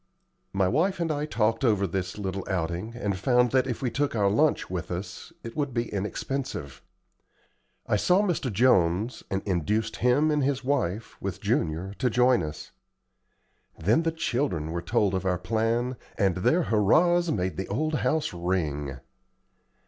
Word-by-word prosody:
My 95 -1 +2
wife 180 - +1
and 165 -2 0
I 150 0 -2
talked 115 -3 0
over 105 -5 +3
this 95 +1 -3
little 95 -2 -3
outing, 90 +4 -2
and 100 -5 -2
found 125 +5 +2
that 130 -1 +2
if 125 +1 -4
we 125 - 0
took 140 0 -1
our 100 -2 +2
lunch 150 +8 +2
with 90 -2 -4
us, 90 - -6
it 115 -1 -8
would 140 -4 -2
be 115 -2 -2
inexpensive. 105 - -4 1.0
I 105 - +1
saw 180 - +3
Mr. 170 - -1
Jones, 105 -1 +2
and 95 0 -2
induced 100 +4 -1
him 140 +6 +3
and 150 -2 +1
his 135 -1 0
wife, 115 -6 -2
with - - -4
Junior, 85 +5 -1
to 130 - +2
join 125 -1 +4
us. 75 -1 -6 1.1
Then 105 - +2
the 165 0 0
children 120 - -1
were 85 +1 -2
told 100 +2 +1
of 95 - -1
our 90 -1 +1
plan, 115 +6 0 0.2
and 95 -3 +2
their 165 - +2
hurrahs 170 - +3
made 95 -5 -1
the 95 - -4
old 155 +10 -1
house 155 -9 0
ring. 80 -6 -2
110 Hz, 165 wpm, -27 LUFS, 95-135 Hz, 1.1 s, join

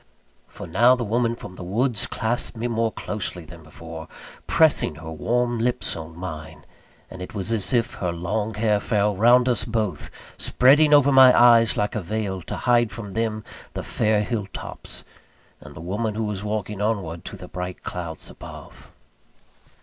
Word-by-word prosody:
For - - -10
now 120 +9 +4
the 125 - -3
woman 115 +2 0
from 105 -5 -10
the 90 - -9
woods 110 +5 +1
clasped 115 +1 -2
me 115 +2 -2
more 115 -1 0
closely 95 -6 -4
than 85 0 -12
before, 80 0 -10 0.4
pressing 155 - +3
her 80 +2 -8
warm 120 +8 0
lips 125 +2 +1
on 80 0 -9
mine; 80 -3 -8 0.5
and 90 - -9
it 90 - -8
was 100 +3 -1
as 100 -4 0
if 120 -1 +1
her 90 -2 0
long 105 +6 -3
hair 105 -1 +2
fell 105 -1 +1
round 120 +5 +5
us 125 - +2
both, 110 -4 -2 0.3
spreading 145 +4 +4
over 145 -1 +6
my 130 -1 +7
eyes 115 -2 +6
like 105 - 0
a 110 - -2
veil, 100 0 -3
to - - -6
hide 120 -2 +3
from 105 -4 -7
them 110 0 -2 0.3
the - - -4
fair 105 -1 +1
hill 105 -3 -3
tops, - - -6 0.6
and - - -13
the - - -9
woman 105 +5 -2
who 110 - -1
was 105 -2 -3
walking 105 -1 -3
onward 95 -6 -2
to 100 - -7
the 90 0 -10
bright 90 0 -6
clouds 85 -3 -4
above. - - -12
105 Hz, 175 wpm, -23 LUFS, 90-120 Hz, 0.6 s, my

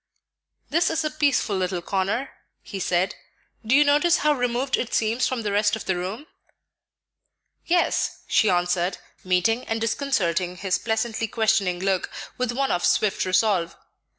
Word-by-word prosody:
"This 335 +3 +2
is 325 0 -1
a 305 - -1
peaceful 285 -8 +1
little 180 -2 -2
corner," 200 +9 -1 0.3
he 195 - -7
said. 180 0 0 0.5
"Do 225 +4 +2
you 295 - +7
notice 295 +4 +3
how 300 - +5
removed 245 0 0
it 240 - -3
seems 225 +3 +1
from 250 -3 -3
the 205 - -1
rest 210 +1 +2
of 220 - -7
the 190 - 0
room?" 190 +10 -5 1.4
"Yes," 350 +1 +1
she 215 - +3
answered, 175 0 +1 0.3
meeting 185 +7 +1
and 225 0 -2
disconcerting 185 - -1
his 185 0 -1
pleasantly 225 0 -1
questioning 220 -5 +1
look 190 -1 0 0.3
with 250 -1 -1
one 270 +2 -1
of 175 - 0
swift 210 -3 +2
resolve. 185 -2 +1
220 Hz, 150 wpm, -24 LUFS, 185-255 Hz, 1.4 s, you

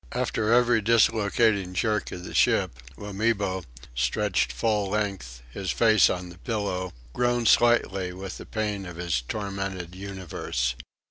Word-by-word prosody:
After 110 0 0
every 120 -1 +4
dislocating 110 -3 +2
jerk 105 +2 0
of 90 - -7
the - - -8
ship, - - +3 0.3
Wamibo, 100 -3 -1 0.3
stretched 60 - 0
full 105 - 0
length, 95 - -3
his 95 +7 -5
face 110 -3 +5
on 90 -1 -3
the 85 0 -13
pillow, 95 -4 -2 0.2
groaned 120 -1 +1
slightly 100 -6 +3
with 95 +1 -7
the - - -10
pain 105 -3 -3
of 85 - -8
his 85 -6 -1
tormented 95 - -4
universe. 95 -10 -3
100 Hz, 135 wpm, -26 LUFS, 90-110 Hz, 0.3 s, face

